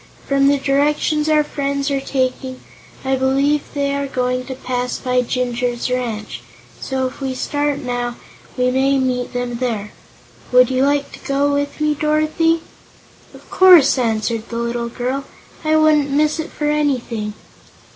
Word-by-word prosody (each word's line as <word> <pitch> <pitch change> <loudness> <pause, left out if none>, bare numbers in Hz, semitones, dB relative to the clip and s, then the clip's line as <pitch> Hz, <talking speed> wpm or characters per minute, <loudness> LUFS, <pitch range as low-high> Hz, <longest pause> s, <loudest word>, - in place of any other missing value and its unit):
From 275 0 +3
the 285 0 +4
directions 295 +2 +1
our 305 -1 +4
friends 280 -1 -2
are 275 -1 0
taking, 260 -1 -2 0.5
I 265 0 +2
believe 275 +3 +2
they 280 -1 0
are 280 0 -2
going 255 -1 -1
to 260 - -5
pass 250 -1 -3
by 250 -1 +1
Jinjur's 245 0 -2
Ranch, 220 - -3 0.4
so 265 -1 -2
if 255 +2 -6
we 265 -1 -2
start 290 +2 -1
now 245 -3 -3 0.4
we 250 0 +2
may 270 +2 +2
meet 255 -2 -1
them 245 -1 -3
there. 225 -5 -3 0.6
Would 250 0 +5
you 260 0 +2
like 285 0 0
to - - -11
go 280 +1 0
with 285 +1 -2
me, 305 0 +2
Dorothy?" 310 +2 +1 0.7
"Of - - -16
course," 350 -8 +7
answered 225 -1 -1
the 235 - -6
little 235 0 -2
girl; 255 +3 -3 0.4
"I 310 0 +2
wouldn't 305 -2 +4
miss 300 +3 +1
it 320 - -4
for 300 - -4
anything." 250 -8 -1
265 Hz, 155 wpm, -19 LUFS, 250-285 Hz, 0.7 s, course